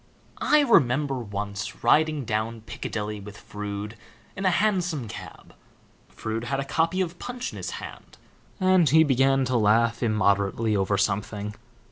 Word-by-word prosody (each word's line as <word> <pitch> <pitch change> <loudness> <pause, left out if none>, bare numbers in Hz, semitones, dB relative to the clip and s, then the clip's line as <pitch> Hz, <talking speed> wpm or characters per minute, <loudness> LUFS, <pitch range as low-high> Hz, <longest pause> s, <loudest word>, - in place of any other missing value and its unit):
I 300 0 +5
remember 140 - +3
once 100 -2 -5
riding 155 -3 +3
down 110 +1 -2
Piccadilly 105 -1 -5
with 105 +1 -10
Froude 105 +1 -6 0.4
in 195 - -4
a - - +5
hansom 180 - 0
cab. - - -10 0.6
Froude 110 +2 -4
had 135 +2 -1
a 140 - -2
copy 165 +6 +1
of 175 -1 -3
Punch 245 +1 -5
in - - -8
his - - -4
hand, - - -10 0.4
and 185 -4 +4
he 160 +4 +6
began 135 -1 +3
to 125 0 -1
laugh 115 +2 +3
immoderately 105 -1 +1
over 100 0 +1
something. 105 +1 -1
115 Hz, 145 wpm, -25 LUFS, 105-160 Hz, 0.6 s, he